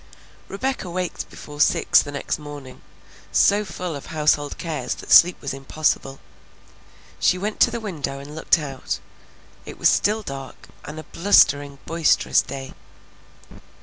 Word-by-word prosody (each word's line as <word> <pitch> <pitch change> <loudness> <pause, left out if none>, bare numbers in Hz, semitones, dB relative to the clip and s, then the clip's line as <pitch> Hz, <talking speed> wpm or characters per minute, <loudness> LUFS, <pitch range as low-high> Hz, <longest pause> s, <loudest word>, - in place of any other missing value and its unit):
Rebecca 230 -1 -3
waked 180 0 -4
before 145 0 -8
six - - +4
the 145 - -7
next 140 +2 -3
morning, 145 -3 -10 0.5
so 205 +1 +4
full 175 -3 -5
of 140 - -9
household 150 -2 0
cares 155 -7 -3
that - - -10
sleep 175 +1 +7
was 140 - -4
impossible. 135 0 -1 1.0
She 185 - +3
went 205 +3 -4
to - - +6
the 235 0 -4
window 155 -10 -4
and 140 +2 -10
looked 160 - +2
out; 140 -5 -4 0.7
it - - -10
was - - +4
still 215 +1 +1
dark, 135 -5 -9 0.2
and 155 +2 -7
a - - -8
blustering, 145 -5 +3
boisterous 165 -1 +2
day. 135 -1 -8
150 Hz, 145 wpm, -22 LUFS, 140-180 Hz, 1.0 s, sleep